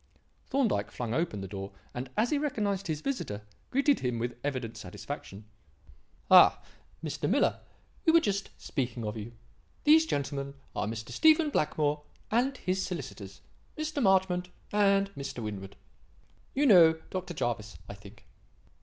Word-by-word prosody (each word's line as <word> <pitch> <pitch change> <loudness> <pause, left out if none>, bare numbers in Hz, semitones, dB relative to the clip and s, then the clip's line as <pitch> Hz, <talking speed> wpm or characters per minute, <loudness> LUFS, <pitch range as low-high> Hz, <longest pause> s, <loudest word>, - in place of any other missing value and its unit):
Thorndyke 225 - +1
flung 115 -1 -4
open 150 - -1
the 95 - -5
door, 95 0 -6 0.2
and, 125 +1 -5
as 235 +3 +2
he 295 - +2
recognized 210 -9 -1
his 155 -2 -2
visitor, 110 - -3 0.3
greeted 275 +1 +3
him 125 -2 -1
with 120 +1 -3
evident 130 -5 -3
satisfaction. 100 -1 -8 0.8
"Ha! - - +8 0.4
Mr. 155 - -2
Miller; 265 +8 +2 0.4
we 325 - +5
were 335 - +7
just 200 -9 -1
speaking 125 -4 -3
of 105 +1 -3
you. 110 +2 -7 0.5
These 315 +2 +6
gentlemen 140 - -2 0.2
are - - -1
Mr. 110 0 -5
Stephen 315 -1 +5
Blackmore 150 - +1 0.3
and 255 +4 +2
his 190 -2 -1
solicitors, 110 - -6 0.4
Mr. 310 -1 -2
Marchmont 185 -3 +3 0.2
and 200 -1 +3
Mr. 135 - -6
Winwood. 100 -2 -6 0.8
You 285 +2 +3
know 175 -9 +8 0.2
Dr. 185 -2 -4
Jervis, 105 - -3
I - - -7
think." 100 +1 -15
155 Hz, 145 wpm, -30 LUFS, -, 0.8 s, Ha